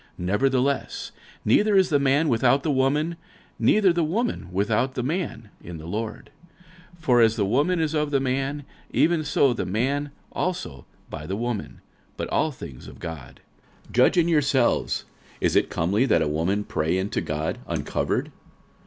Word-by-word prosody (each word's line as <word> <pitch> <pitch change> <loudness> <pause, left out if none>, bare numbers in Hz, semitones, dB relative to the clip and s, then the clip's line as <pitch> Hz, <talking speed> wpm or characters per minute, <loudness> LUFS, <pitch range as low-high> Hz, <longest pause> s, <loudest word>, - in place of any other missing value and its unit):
46:011:011 90 - -5
Nevertheless 135 +4 0 0.3
neither 205 - +4
is 190 -1 +4
the 145 - +3
man 140 +3 +3
without 130 +2 +3
the 155 - +1
woman, 145 +5 +1 0.4
neither 200 -4 +4
the 170 -1 +1
woman 220 +10 -1
without 105 +7 0
the 125 - -1
man, 135 - -3
in 85 -1 -7
the 80 - -10
Lord. 110 +6 -5 0.6
46:011:012 170 - -23
For 125 -4 +4
as 110 -1 +4
the 105 -4 +1
woman 145 - +2
is 160 -1 0
of 150 -1 0
the 140 -2 +2
man, 135 +2 -1 0.3
even 165 -1 +2
so 140 -2 +3
is 120 - -3
the - - -1
man 135 +9 0 0.2
also 180 - -3 0.2
by 75 -1 -6
the 95 +3 -2
woman; 120 -2 -4 0.4
but - - -3
all 155 - +1
things 80 - -10
of - - -11
God. 80 -7 -8 0.5
46:011:013 - - -13
Judge 125 +9 +4
in 170 -1 +4
yourselves: 140 -6 +2 0.3
is - - +1
it - - +3
comely 100 +10 +1
that - - +3
a - - -1
woman 85 +7 0
pray 80 -1 -1
unto 95 +2 -2
God 75 +1 -3
uncovered? - - -2
130 Hz, 175 wpm, -24 LUFS, 105-150 Hz, 0.6 s, neither